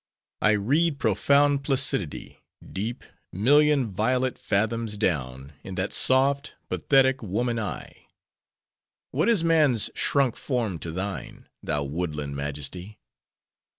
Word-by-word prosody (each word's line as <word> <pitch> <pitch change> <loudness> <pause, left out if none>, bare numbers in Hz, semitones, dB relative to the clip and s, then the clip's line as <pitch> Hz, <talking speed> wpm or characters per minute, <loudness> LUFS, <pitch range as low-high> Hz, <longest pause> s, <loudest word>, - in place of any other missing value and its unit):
I 110 - +4
read 145 +10 +1
profound 140 +6 +2
placidity—deep—million— 130 - -1
violet 125 +6 0
fathoms 110 +1 -1
down, 70 - -2
in 95 - -7
that 95 +2 -2
soft, 135 +2 +2
pathetic, 135 -1 +3
woman 115 +3 -1
eye! 105 -3 -7 1.0
What 155 - +1
is 215 -8 +3
man's 150 -9 +3
shrunk 135 -4 +1
form 115 - -2
to 85 - -6
thine, 95 +4 -6 0.2
thou 75 -1 -1
woodland 75 -1 -4
majesty? 75 +8 -5
110 Hz, 100 wpm, -25 LUFS, 95-135 Hz, 1.0 s, I